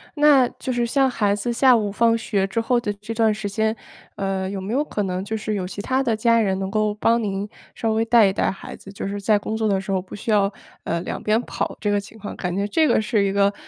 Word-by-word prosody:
那 290 -4 +5
就 260 - -3
是 240 -1 +1
像 270 +3 +2
孩 210 -5 +1
子 205 +4 -2
下 255 +1 +5
午 215 -3 0
放 230 +2 +3
学 205 -3 0
之 195 +4 -2
后 245 +2 +1
的 220 -3 -2
这 210 +3 -7
段 220 -1 +2
时 210 -1 -4
间， 220 +2 0 0.4
呃， 195 -1 -2
有 195 - -4
没 195 +4 -4
有 280 +4 +2
可 210 -8 -3
能， 185 -1 -2
就 220 +2 -3
是 215 0 -3
有 195 -3 -2
其 200 +2 -6
他 260 +4 0
的 235 -4 +1
家 230 +1 +3
人 190 -3 0
能 190 0 -3
够 215 0 0
帮 230 +2 +2
您 200 0 -2 0.3
稍 225 -1 -1
微 225 - +2
带 230 -1 +5
一 190 - 0
带 - - +1
孩 195 - -9
子？ 195 - -13
就 195 - -5
是 200 +1 -4
在 210 +1 +3
工 215 +2 -4
作 220 - -1
的 195 -2 +2
时 195 +1 -5
候 185 - +1
不 185 - -14
需 210 +3 -7
要， 205 -2 +3 0.3
呃， 170 - -1
两 - - -5
边 215 +2 +2
跑 - - -4
这 210 - -1
个 205 0 +2
情 220 +2 -14
况， 205 - -7
感 180 -1 -3
觉 200 +2 -1
这 315 +10 +2
个 295 - +3
是 215 -1 +1
一 195 - +1
个 200 0 +2
210 Hz, 300 characters per minute, -22 LUFS, 200-230 Hz, 0.4 s, 那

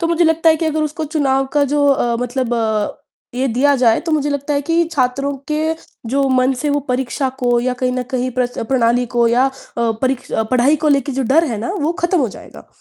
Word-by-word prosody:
तो 335 - +1
मुझे 340 0 +2
लगता 325 0 +4
है 315 - +3
कि 325 - -3
अगर 310 0 0
उसको 305 +1 -3
चुनाव 275 -3 0
का 285 - +4
जो 290 -1 +3
अ, 240 -4 +2
मतलब 245 0 -2 0.8
ये 260 +2 0
दिया 275 +5 +2
जाए 235 -3 +3
तो 330 -2 -3
मुझे 295 -1 +1
लगता 285 +1 -2
है 285 - 0
कि 335 +2 +2
छात्रों 275 0 0 0.2
के 310 +1 0 0.3
जो 275 +4 +1
मन 255 0 +2
से 300 - -1
वो 290 - +1
परीक्षा 260 +2 -1
को 245 -1 +2
या 255 +1 0
कहीं 250 0 +1
न 255 0 -1
कहीं 255 0 -1
प्र 245 -2 -1
प्रणाली 245 -1 +2
को 240 -1 +3
या 245 +3 +3
अ, - - -1 0.3
परी 235 +3 0 0.3
पढ़ाई 255 +4 +3
को - - +4
लेके 280 -1 +1
जो 270 - -1
डर 325 +3 +5
है 220 - -3
ना 235 - -3
वो 305 +3 0
खत्म 350 0 +2
हो 255 - +1
जाएगा - - -13
270 Hz, 230 wpm, -18 LUFS, 250-300 Hz, 0.8 s, डर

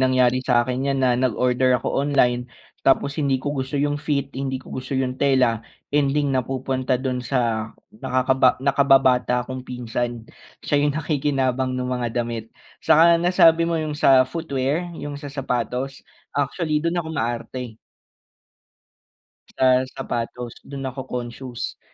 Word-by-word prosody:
nangyari 130 -1 +3
sa'kin 125 +2 +1
'yan 135 -1 +1
na 125 - +4
nag-order 125 +1 +2
ako - - -3
online, 125 -4 +1 0.4
tapos 140 +2 +2
hindi 140 -2 +2
ko 145 - -1
gusto 135 0 -4
yung 145 +1 0
fit, 140 -2 -1
hindi 135 -1 -2
ko - - -14
gusto 130 +1 -5
yung 130 -1 -1
tela, 130 -5 +3 0.3
ending 145 0 +2
napupunta 130 0 -1
dun 130 -1 -2
sa 115 -3 -1 0.2
nakakaba 130 +2 +2
nakababata 130 -3 +3
kong 130 +1 -6
pinsan, 120 -1 -3 0.4
siya 145 - +2
yung 145 -1 +1
nakikinabang 135 -4 0
nung 125 0 -2
mga 120 -1 -1
damit. 115 -1 -5 0.3
Saka 170 +1 +5
nasabi 170 -2 +5
mo 170 - 0
yung 155 -1 -2
sa 130 -3 +6
footwear, 145 +3 -2
yung 145 -1 -6
sa 145 - -7
sapatos, 130 -1 -3 0.3
actually 150 +2 0
dun 170 +2 -1
ako 160 -2 -2
maarte. 120 -2 -4 1.8
Sa 130 -1 +5
sapatos 120 0 -5
dun 140 -1 -8
ako 130 0 -5
conscious, 125 0 -6
130 Hz, 135 wpm, -22 LUFS, 125-140 Hz, 1.8 s, sa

